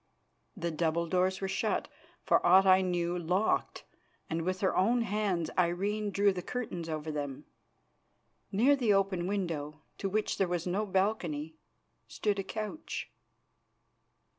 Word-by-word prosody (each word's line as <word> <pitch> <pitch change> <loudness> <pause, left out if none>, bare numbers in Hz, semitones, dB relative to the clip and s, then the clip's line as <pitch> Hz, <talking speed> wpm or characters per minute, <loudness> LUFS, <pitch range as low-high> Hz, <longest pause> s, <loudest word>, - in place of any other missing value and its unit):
The 170 -2 -2
double 165 +1 0
doors 185 +2 +1
were 195 - -1
shut, 195 - -1 0.4
for - - +3
aught 190 +2 +6
I 190 0 +6
knew 175 -1 0
locked, 180 +5 0 0.5
and 165 +1 0
with 185 +2 -2
her 190 - +1
own 235 +6 +3
hands 200 -6 -1
Irene 200 +5 0
drew 200 0 +3
the 180 - -4
curtains 180 -7 -4
over 155 0 -3
them. 145 -3 -5 1.1
Near 245 +9 +4
the 240 -6 +2
open 190 -3 +1
window, 160 -6 -3 0.2
to 195 - -1
which 215 +2 -1
there 195 - +3
was 175 -1 -2
no 195 +4 -1
balcony, 180 -6 -1 0.5
stood 205 -2 -1
a - - -1
couch. 215 - -5
185 Hz, 140 wpm, -31 LUFS, 170-205 Hz, 1.1 s, aught